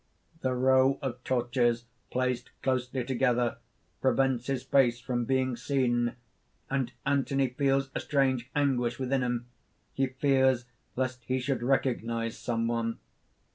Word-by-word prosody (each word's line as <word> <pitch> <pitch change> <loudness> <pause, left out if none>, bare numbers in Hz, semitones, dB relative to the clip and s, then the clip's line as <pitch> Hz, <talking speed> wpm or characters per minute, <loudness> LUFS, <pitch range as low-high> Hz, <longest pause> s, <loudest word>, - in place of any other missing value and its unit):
_ - - -40
_The 125 -1 -1
row 130 +1 +4
of 125 -1 -4
torches 120 -1 +1 0.2
placed 125 -1 -1
closely 130 -1 0
together, 125 -1 +1 0.4
prevents 130 -2 +2
his 135 -2 -1
face 120 -3 +3
from 125 -1 -2
being 130 0 +1
seen; 120 -1 0 0.6
and 135 -3 0
Anthony 135 -1 +1
feels 135 +1 +1
a - - -1
strange 130 -3 +1
anguish 125 -5 +1
within 130 0 0
him. 120 -1 -1 0.5
He 135 0 +1
fears 130 -2 +2 0.3
lest 130 -1 -2
he 130 0 0
should 130 -1 -1
recognize 115 -3 0
some 115 -1 -1
one. 115 -1 -1
130 Hz, 135 wpm, -29 LUFS, 120-135 Hz, 0.6 s, row